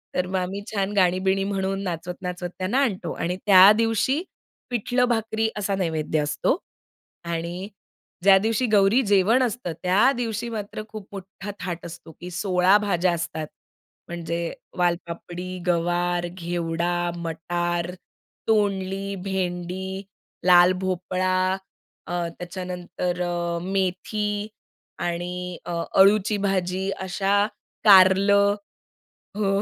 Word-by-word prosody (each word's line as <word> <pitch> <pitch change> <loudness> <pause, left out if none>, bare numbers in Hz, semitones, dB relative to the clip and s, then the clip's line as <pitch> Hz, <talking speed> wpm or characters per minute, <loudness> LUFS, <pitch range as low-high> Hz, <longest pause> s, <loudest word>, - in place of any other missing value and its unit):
तर 180 0 0
मग 190 - -4
आम्ही 190 +2 -3
छान 200 -1 -1
गाणी-बिणी 190 0 +2
म्हणून 195 0 -1
नाचवत-नाचवत 180 0 -4
त्यांना 195 +8 +1
आणतो. 185 - -2
आणि 180 +2 -2
त्या 195 0 +9
दिवशी 230 +7 +1 0.5
पिठलं-भाकरी 230 -2 0
असा 200 -1 -1
नैवेद्य 160 -4 -1
असतो. 150 - 0 0.7
आणि 170 +3 -4 0.5
ज्या 195 0 +8
दिवशी 225 +5 +1
गौरी 210 +5 +5
जेवण 205 +6 +4
असतं, 235 -7 -2
त्या 195 +8 +4
दिवशी 235 -1 -2
मात्र 215 -2 -5
खूप 215 -3 -9
मोठा 195 +1 -8
थाट 175 -2 -5
असतो, 165 -1 -10
की 180 - -6
16 180 +1 +3
भाज्या 185 -4 +1
असतात 160 -2 -4 0.6
म्हणजे 170 -1 -4 0.4
वालपापडी, 175 +1 -2
गवार, 175 0 +1
घेवडा, 170 -1 -2 0.2
मटार, 175 +1 -2 0.6
तोंडली, 195 -2 0
भेंडी, 190 0 -3 0.4
लाल 180 0 +7
भोपळा 185 0 -1 0.7
अ, - - -4 0.2
त्याच्यानंतर 180 0 -4
अ, 175 -1 -1
मेथी 205 +3 -1 0.5
आणि 175 +1 -2 0.3
अ, - - -5 0.3
अळूची 205 +2 +5
भाजी 190 -1 -1 0.2
अशा 195 +2 +2 0.4
कारलं. 200 +1 +6 0.8
हो. 195 -1 +1
185 Hz, 105 wpm, -24 LUFS, 175-200 Hz, 0.8 s, त्या